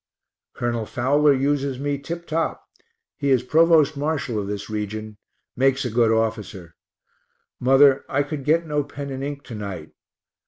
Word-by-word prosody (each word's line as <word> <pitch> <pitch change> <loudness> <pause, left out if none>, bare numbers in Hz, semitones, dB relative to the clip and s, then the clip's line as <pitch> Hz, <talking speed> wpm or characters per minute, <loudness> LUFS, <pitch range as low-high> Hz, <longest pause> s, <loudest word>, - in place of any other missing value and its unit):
Col. 120 -2 -2
Fowler 145 +4 +3
uses 140 0 0
me 140 +1 -2
tip 170 +4 -6
top 165 0 -2 0.5
he 140 -2 -1
is 130 -3 +3
provost 155 +2 +4
marshal 140 -6 -2
of 100 - -4
this 100 0 -5
region; 110 0 -5 0.4
makes 135 +1 +2
a 125 - -2
good 115 0 +3
officer. 110 -6 -2 0.9
Mother, 135 +1 +5
I 140 +1 +1
could 145 -1 -5
get 160 +4 +2
no 150 -2 -1
pen 140 0 -7
and 135 0 -5
ink 140 0 -5
to 120 - -10
night. 95 -7 -6
135 Hz, 155 wpm, -23 LUFS, 115-145 Hz, 0.9 s, Mother